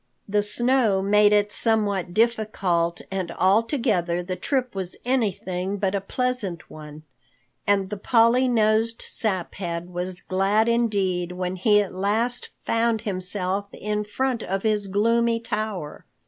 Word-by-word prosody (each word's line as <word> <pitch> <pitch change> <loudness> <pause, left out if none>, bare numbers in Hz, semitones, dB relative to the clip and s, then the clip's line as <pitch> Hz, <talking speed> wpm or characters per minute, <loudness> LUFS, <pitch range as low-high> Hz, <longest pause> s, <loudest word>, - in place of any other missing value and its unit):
The 205 +1 +2
snow 215 -1 +1
made 210 +1 +4
it 205 0 +3
somewhat 205 -6 +1
difficult 195 -6 0
and 190 -3 -2
altogether 195 - +1
the 185 +1 -4
trip 255 +3 -1
was 190 -2 -5
anything 200 -6 -1
but 195 -1 -1
a 200 - 0
pleasant 215 -5 -2
one, 150 0 -10 0.6
and 200 -1 +2
the 210 - -3
Polly 235 +4 +3
nosed 225 -1 +1
Saphead 180 -4 -3
was 180 +1 -5
glad 195 +4 +1
indeed 195 -7 0
when 180 0 -3
he 210 +2 +4
at 195 - -9
last 215 +6 -1 0.2
found 230 -1 +1
himself 190 -1 -1
in 210 0 -2
front 250 +3 -2
of 195 -1 -3
his 210 -2 0
gloomy 230 +4 +2
tower. 210 -8 -4
205 Hz, 135 wpm, -24 LUFS, 185-225 Hz, 0.6 s, made